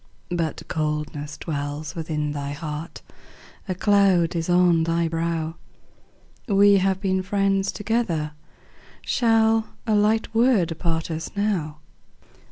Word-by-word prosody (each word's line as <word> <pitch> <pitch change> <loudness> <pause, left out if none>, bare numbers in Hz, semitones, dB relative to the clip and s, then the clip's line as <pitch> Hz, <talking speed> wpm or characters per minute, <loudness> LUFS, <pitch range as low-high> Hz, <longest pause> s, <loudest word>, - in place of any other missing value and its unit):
But 165 -3 -2
coldness 150 -1 -3
dwells 145 -1 -4
within 155 -2 -3
thy 145 -1 -4
heart, 150 +1 -6 0.7
A 185 - -1
cloud 190 -4 +3
is 165 +1 -2
on 175 -2 +4
thy 165 +1 +1
brow; 165 0 -2 0.9
We 200 -1 +5
have 190 0 +1
been 190 -1 0
friends 195 0 +1
together, 210 -9 -1 0.7
Shall 225 -1 +2
a 220 - +1
light 210 +2 +2
word 215 -9 +2
part 165 -1 -1
us 160 0 -4
now? 175 -8 -1
170 Hz, 115 wpm, -24 LUFS, 155-200 Hz, 0.9 s, We